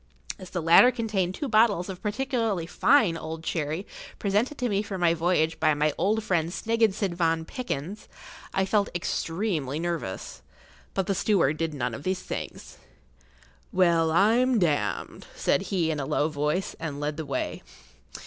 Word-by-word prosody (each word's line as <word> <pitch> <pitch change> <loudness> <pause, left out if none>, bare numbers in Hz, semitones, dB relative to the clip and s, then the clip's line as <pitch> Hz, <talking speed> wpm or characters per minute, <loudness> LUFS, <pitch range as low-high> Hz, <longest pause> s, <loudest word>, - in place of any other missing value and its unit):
As 185 -2 -10
the 175 -3 -3
latter 170 +9 +8
contained 215 -7 -1
two 290 - -3
bottles 215 -6 +3
of 190 -2 -7
particularly 225 - -1
fine 210 0 +3
old 160 0 -6
sherry 160 +3 -2 0.3
presented 215 +8 0
to 250 - -1
me 200 -3 +1
for 200 -2 -5
my 175 -2 +3
voyage 165 -1 +1
by 155 -1 +3
my 150 0 +1
old 210 +5 +1
friend 170 -5 0
Snigginson 215 -1 0
van 165 -2 0
Pickyns, 205 - -5 0.4
I 195 - +1
felt 200 +1 +1
extremely 165 -4 -2
nervous. 165 - -4 0.5
But 195 - 0
the 195 - 0
steward 175 -7 +2
did 160 -2 -2
none 125 -3 -2
of 125 - -6
these 185 +3 -2
things.[Pg - - -7
13] - - -26 0.9
"Well, 170 -3 +3
I'm 230 +8 +4
d——d!" 145 - -1
said - - +1
he 170 -5 +1
in 150 - -3
a 135 - -3
low 150 - +1
voice, 150 +5 -1
and 155 -3 -4
led 150 0 -3
the 160 - -4
way. 135 -2 -3
175 Hz, 165 wpm, -26 LUFS, 160-210 Hz, 0.9 s, latter